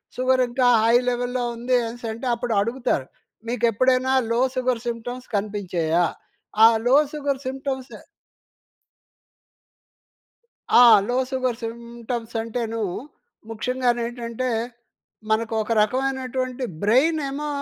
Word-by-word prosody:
Sugar 255 0 +2
ఇంకా 250 +1 +2 0.2
high 230 +1 +4
లెవెల్‌లో 245 0 -2
ఉంది 245 +2 +1
అనేసంటే, 230 0 -6
అప్పుడు 235 0 -2
అడుగుతారు 230 - -1 0.4
"మీకెప్పుడైనా 255 +3 +2 0.2
లో 230 - +1 0.2
సుగర్ 255 -2 0
సింప్టమ్స్ 245 +2 -5
కనిపించాయా?" 180 -5 0 0.6
ఆ - - +11 0.2
లో 255 - +5 0.2
సుగర్ 280 -3 -2
సింప్టమ్స్ 265 0 -4 2.8
ఆ! - - +9 0.3
లో 245 - 0
సుగర్ 255 -3 -1
సింప్టమ్స్ 235 0 -6
అంటేను 230 0 -4 0.7
ముఖ్యంగానేంటంటే 240 +1 -2 0.8
మనకు 220 +1 0
ఒక 215 - -4
రకమైనటువంటి 255 +1 -1 0.2
బ్రెయిన్ 265 +10 +3
ఏమో 290 +2 -4
245 Hz, 95 wpm, -23 LUFS, 230-255 Hz, 2.8 s, ఆ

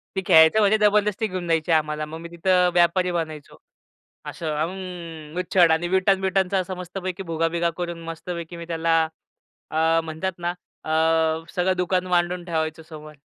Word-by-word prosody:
ती 190 - 0
खेळायचं 160 +6 +6
म्हणजे 210 0 +4
जबरदस्ती 210 0 +2
घेऊन 185 -3 -5
द्यायची 165 0 +1
आम्हाला, 155 -1 +1
मग 155 +1 -8
मी 170 0 -9
तिथं 180 +1 +2
व्यापारी 175 +1 +3
बनायचो. 155 -3 -5 0.7
असं 155 -2 -4
अं, 170 -1 -6
उच्छड 180 -1 +4
आणि 160 +2 +1
विटा-बिटांचा 190 0 +1
मस्तपैकी 185 +1 -5
भुगा-बिगा 165 +1 0
करून 170 -1 -5
मस्तपैकी 170 +1 -6
मी 170 - -7
त्याला 165 0 0 0.8
अ, 160 +1 +2
म्हणतात 160 +4 -3
ना, 175 0 -2 0.3
अ, 160 0 +1
सगळं 185 0 +1
दुकान 180 0 0
मांडून 175 0 0
ठेवायचो 160 -2 -2
समोर. 155 -1 -11
170 Hz, 145 wpm, -23 LUFS, 160-185 Hz, 0.8 s, खेळायचं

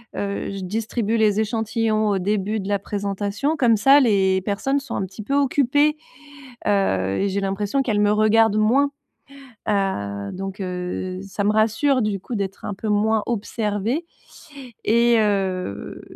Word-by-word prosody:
heu, 200 0 -3
je 195 - -5
distribue 225 +3 -1
les 215 -1 +3
échantillons 220 0 0
au 200 -2 +1
début 205 +2 -1
de 195 - -6
la 200 -1 +1
présentation 205 +8 -2
comme 240 -5 +4
ça 270 +7 +6
les 195 -7 +3
personnes 220 +9 -1
sont 275 - -7
un 190 - -1
petit 195 +3 -9
peu 275 - -3
occupées 285 +2 +2 0.7
heu, 95 - +1
et 200 - +1
j'ai 200 +1 -1
l'impression 200 +7 -1
qu'elles 220 -5 0
me 205 - +3
regardent 215 0 +3
moins, 265 +7 +3 0.8
heu, 100 - -1
donc, 195 +1 -6
heu, 185 0 -4
ça 200 +1 -4
me 210 - +3
rassure. 225 +5 +2
Du 205 -2 -1
coup 240 - -6
d'être 195 -1 -4
un 205 - -3
peu 215 +3 -5
moins 215 +1 +2
observée, 225 - -2 0.8
et 235 +1 +4
heu, 190 - -2
210 Hz, 155 wpm, -22 LUFS, 195-225 Hz, 0.8 s, ça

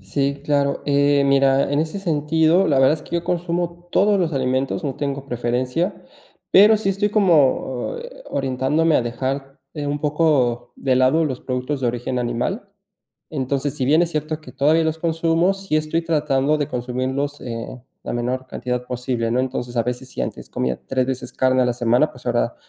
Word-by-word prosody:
Sí, 140 +8 -2
claro. 140 -1 +1
Eh, 145 0 +3
mira, 135 0 +3
en 145 - +1
ese 160 +5 -3
sentido, 160 +1 +2
la 140 -4 +3
verdad 135 +3 +5
es 155 - -9
que - - -8
yo 170 - -3
consumo 175 0 -2
todos 205 0 +3
los 170 -3 0
alimentos, 130 0 -1
no 135 - -2
tengo 140 -1 -3
preferencia, 125 - -1 0.6
pero 210 +3 +7
sí 210 -2 -2
estoy 200 +2 0
como, 150 - +2
eh, - - -10
orientándome 135 +4 +1
a - - +2
dejar 135 +3 -4 0.2
eh, 145 -2 -4
un 145 0 -2
poco 145 -6 +1
de 130 -2 +1
lado 130 +6 +3
los 130 -4 -3
productos 130 +2 -3
de 125 - 0
origen 125 +1 -2
animal. 125 - -2 0.6
Entonces, 140 0 -2
si 135 -4 -2
bien 155 +4 +4
es 170 - -1
cierto 155 0 -3
que - - -13
todavía 155 +4 +3
los 160 0 -1
consumo, 165 +3 +1
sí 195 -5 -2
estoy 155 +2 0
tratando 150 -2 +1
de 145 0 -1
consumirlos, 130 +3 -3
eh, 115 +1 -6 0.2
la - - -4
menor 125 +2 -2
cantidad 125 0 -3
posible, 125 -2 -2
¿no? 120 - +1
Entonces 125 -2 -4
a 115 - +3
veces 125 +1 -4
si - - -6
antes - - -6
comía 65 -1 -2
3, 130 -1 0
veces 130 -1 -4
carne 130 0 +2
a - - +2
la 125 - +1
semana, 120 0 +2
pues - - -15
ahora - - 0
140 Hz, 190 wpm, -21 LUFS, 130-160 Hz, 0.6 s, pero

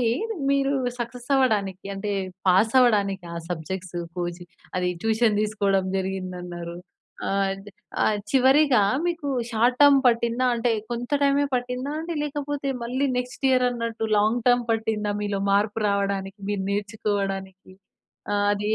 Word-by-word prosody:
మళ్ళీ, - - +1 0.5
మీరు 275 0 +2 0.2
సక్సెస్ 240 +1 -6
అవ్వడానికి, 200 -8 +1
అంటే, 200 +1 -4 0.4
పాసవడానికి 200 -1 +3
ఆ - - -5
సబ్జెక్ట్సు 175 +1 -4 0.2
కోచి 175 0 -4 0.3
అది 180 0 +1
ట్యూషన్ 220 -1 +2
దీసుకోడం 200 -2 +1
జరిగిందన్నారు. 180 -2 -4 0.5
ఆహ్, 195 0 +1
అది 195 +2 -9 0.3
ఆహ్, 215 - +2
చివరిగా 265 -1 +5 0.3
మీకు 335 -4 -2 0.2
షార్ట్ 240 +2 +2
టర్మ్ 285 -1 +7
పట్టిందా, 235 +1 +2
అంటే 235 +1 0 0.2
కొంత 240 0 -4
టైమే 280 0 +3
పట్టిందా 250 +3 -2
అండి? 335 +1 -4
లేకపోతే 290 -1 -3
మళ్ళీ 260 +4 0
నెక్స్ట్ 250 +2 -3
ఇయర్ 255 -1 +4
అన్నట్టు 230 -2 -3
లాంగ్ 220 +4 +2
టర్మ్ 245 0 +4
పట్టిందా 220 -2 -1
మీలో 205 -1 -1
మార్పు 205 +2 +1
రావడానికి? 200 0 -1
మీరు 200 -2 -1
నేర్చుకోవడానికి? 200 -2 -3 0.6
ఆ! - - +2 0.2
అది 205 0 -2
220 Hz, 130 wpm, -25 LUFS, 195-250 Hz, 0.6 s, టర్మ్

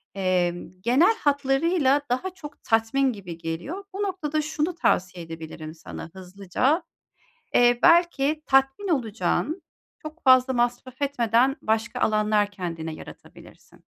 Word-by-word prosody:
emm, 180 -3 0
genel 275 - +4
hatlarıyla 285 +1 +2
daha 255 +10 -1
çok 295 -5 -12
tatmin 230 +4 +1
gibi 180 -6 -9
geliyor. 175 - -5
Bu 395 - -4
noktada 315 -6 -2
şunu 305 +3 -2
tavsiye 180 - 0
edebilirim 160 -1 -8
sana 160 0 -9
hızlıca: 195 - -1 0.7
Eee, 240 0 +4
belki 335 -4 +4
tatmin 270 +8 +2
olacağın, 285 - -1 0.4
çok 310 +2 -10
fazla 255 -1 +5
masraf 245 +2 -2
etmeden 255 -1 +2
başka 225 +3 -1
alanlar 215 -1 +2
kendine 165 -4 -5
yaratabilirsin. - - -14
250 Hz, 115 wpm, -25 LUFS, 195-300 Hz, 0.7 s, fazla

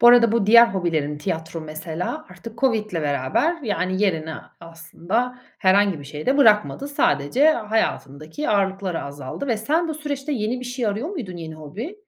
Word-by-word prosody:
Bu 240 - +6
arada 240 -2 +7
bu 230 -4 +1
diğer 235 +2 +8
hobilerin 165 -8 -1
tiyatro 160 +2 -4
mesela 160 - -5
artık 230 0 -11
Covid'le 225 -5 +1
beraber 155 - 0
yani 185 -3 -1
yerini 160 -5 0 0.3
aslında 170 +9 -3 0.2
herhangi 195 -3 +3
bir 145 - -10
şeye 150 +2 -8
de 265 - +3
bırakmadı. 230 +2 +3
Sadece 250 - +2
hayatındaki 210 - -2
ağırlıkları 195 -3 0
azaldı 140 - -6
ve 235 -4 +1
sen 315 +10 0
bu 315 - -2
süreçte 295 -1 -4
yeni 235 0 -1
bir - - -7
şey 245 -1 -3
arıyor 215 +8 -2
muydun 245 - -6
yeni 160 -2 -7
hobi? 195 - -7
205 Hz, 165 wpm, -22 LUFS, 160-250 Hz, 0.3 s, diğer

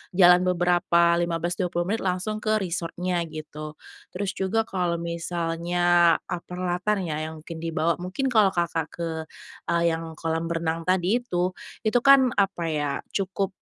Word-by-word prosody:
Jalan 180 -1 +7
beberapa 175 -1 +3
15, 170 0 -1
20 175 -2 0
menit 205 +6 -1
langsung 190 +3 -2
ke 215 0 +1
resort-nya 175 0 -2
gitu. 155 -1 -8 0.4
Terus 195 +1 -2
juga 195 +4 0
kalau 180 -5 -1
misalnya, 170 0 +1
ah, 175 - -4
peralatan 180 +3 -1
ya 155 -1 -3
yang 160 -1 -9
mungkin 165 0 -8
dibawa. 165 +1 0
Mungkin 220 +9 -2
kalau 210 -4 +4
Kakak 170 -2 0
ke, 170 +1 -5 0.6
eee, 170 0 +1
yang 165 0 -5
kolam 165 +1 -2
renang 165 0 -2
tadi 185 +5 +2
itu, 180 -7 -1 0.3
itu 220 +2 +3
kan, 265 -1 +6
apa 195 -3 +1
ya, 145 -2 -1 0.2
cukup, 195 0 -1
175 Hz, 150 wpm, -25 LUFS, 165-190 Hz, 0.6 s, Jalan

